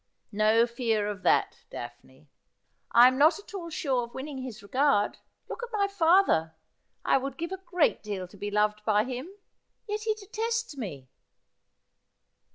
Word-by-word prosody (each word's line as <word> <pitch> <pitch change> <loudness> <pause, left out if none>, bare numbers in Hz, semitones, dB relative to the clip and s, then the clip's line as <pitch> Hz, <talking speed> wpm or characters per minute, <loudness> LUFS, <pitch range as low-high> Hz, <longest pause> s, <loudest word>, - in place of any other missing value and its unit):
' - - -47
No 225 +2 +5
fear 235 -3 -1
of 205 -2 -4
that. - - +2
Daphne.' 130 +4 -10 0.6
'I 240 +1 +8
am 255 0 +1
not 310 +4 +5
at 405 +1 -14
all 350 -4 -5
sure 270 -6 -1
of 235 - -17
winning 270 0 -6
his 240 -5 -7
regard. 255 -1 +1 0.3
Look - - -6
at 485 - -5
my 405 -2 +1
father! 335 - +3 0.5
I - - +4
would 270 0 -5
give 335 +2 -4
a 380 - -3
great 355 -4 +2
deal 200 -3 -5
to 180 - -17
be 205 +1 -5
loved 210 +1 +1
by 210 -1 +3
him, 255 +6 -5 0.6
yet 420 0 -2
he 435 0 0
detests 445 -1 -3
me.' 170 - -7
255 Hz, 165 wpm, -28 LUFS, 210-345 Hz, 0.6 s, I